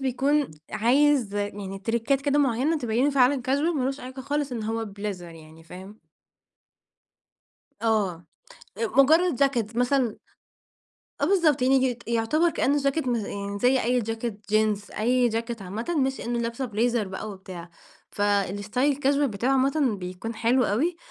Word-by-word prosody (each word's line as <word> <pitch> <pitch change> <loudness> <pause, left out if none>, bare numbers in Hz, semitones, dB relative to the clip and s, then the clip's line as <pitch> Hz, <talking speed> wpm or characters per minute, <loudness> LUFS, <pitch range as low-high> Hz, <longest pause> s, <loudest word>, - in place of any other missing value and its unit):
بيكون 275 +2 +1 0.2
عايز 245 0 +2
يعني 205 -1 -4
تريكات 235 +6 0
كده 285 +1 +1
معينة 280 +4 +1
تبينه 245 +4 +1
فعلًا 265 -1 +3
casual 290 +6 +1
ما 255 - 0
لوش 270 +2 -2
علاقة 255 +1 -8
خالص 285 -1 -2
إن 225 -3 -3
هو 225 +1 -2
بليزر 200 -4 -6
يعني 160 0 -14
فاهم؟ 190 +5 -12 1.8
آه، 195 -7 0 0.5
آآ، 225 0 0 0.2
مجرد 325 +2 +3
جاكيت 235 -5 0
مثلًا 250 -2 +1 1.1
آه - - +2
بالضبط، 320 -7 +3
يعني 265 +1 +4
يت 245 -2 -2
يعتبر 235 +9 +2
كأنه 290 -2 +1
جاكيت 275 0 0
م 240 - +1
يعني 200 -1 -4
زي 250 +3 +3
أي 250 +1 +1
جاكيت 225 -2 -5
جينز، 215 -1 +1
أي 245 +2 +2
جاكيت 230 -1 -3
عامةً، 220 - -4
مش 265 0 0
إنه 240 0 -2
لابسة 235 +3 -3
بليزر 230 -2 0
بقى 200 +3 -6
وبتاع. 185 -3 -10 0.4
فالاستايل 205 +6 0
الcasual 280 0 +1
بتاعه 235 +1 -1
عامةً 270 -3 +2
بيكون 185 +6 -6
حلو 235 +3 +2
أوي، 310 - 0
235 Hz, 150 wpm, -25 LUFS, 205-270 Hz, 1.8 s, يعني